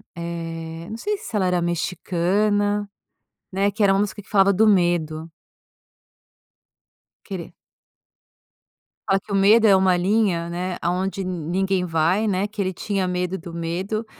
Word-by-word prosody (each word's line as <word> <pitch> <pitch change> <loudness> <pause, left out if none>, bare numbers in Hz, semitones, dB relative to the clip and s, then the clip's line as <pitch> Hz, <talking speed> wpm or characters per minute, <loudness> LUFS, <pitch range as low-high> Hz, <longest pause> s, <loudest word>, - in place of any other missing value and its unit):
eh, 165 -1 -6
não 220 - -5
sei 415 - -2
se 390 - -8
ela 190 -3 +2
era 180 -1 +1
mexicana, 200 +4 0 0.6
né, 195 +2 +1
que 210 +2 -1
era 195 -1 +5
uma 195 - +2
música 205 0 -2
que 200 - -23
falava 200 -1 +4
do 220 +4 +4
medo. 170 -5 +1 2.0
Querer. 190 -4 -7 1.5
Fala 195 0 +3
que 205 - -13
o 200 - +1
medo 210 +4 +5
é 200 - +7
uma 190 -1 +3
linha, 185 -3 +1
né, 180 +1 -3
aonde 190 +2 -1
ninguém 185 +2 -1
vai, 170 +6 +1
né, 200 0 0
que 210 -1 -5
ele 185 -1 -1
tinha 195 +1 -2
medo 180 +1 -2
do 165 +1 -10
medo, 180 +7 -3
185 Hz, 150 wpm, -22 LUFS, 175-205 Hz, 2.0 s, é